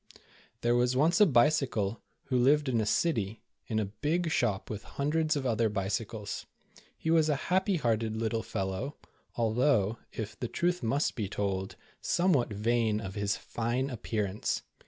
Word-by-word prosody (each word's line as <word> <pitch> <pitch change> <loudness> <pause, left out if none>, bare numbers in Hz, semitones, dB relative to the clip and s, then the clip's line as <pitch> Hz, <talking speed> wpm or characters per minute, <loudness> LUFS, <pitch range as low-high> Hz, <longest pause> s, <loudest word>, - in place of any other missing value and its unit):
THERE 120 0 +2
was 125 +1 +2
once 165 +7 +4
a 210 - +8
Bicycle, 120 - +2 0.2
who 125 - 0
lived 145 +4 +4
in 120 -4 +2
a 105 - -1
city, 110 - 0 0.2
in 110 - -1
a 110 - +1
big 155 - -1
shop 105 -9 0
with 105 -2 -5
hundreds 155 +2 0
of 140 -2 -2
other 115 -2 +2
bicycles. 105 +1 -3 0.5
He 160 - -1
was 160 -2 +4
a 150 - +3 0.2
happy 190 +1 +3
hearted 115 -6 0
little 115 0 -1
fellow, 95 +9 -3 0.4
although, 115 -2 +2
if 110 -2 -6
the 120 - -2
truth 175 +7 0
must 130 +6 +1
be 105 -5 -3
told, 95 -2 -2 0.3
somewhat 165 -10 +2
vain 110 +1 +1
of 95 -3 -6
his 100 -1 -1
fine 120 +4 -2
appearance. 105 -4 -2
120 Hz, 155 wpm, -30 LUFS, 105-145 Hz, 0.5 s, a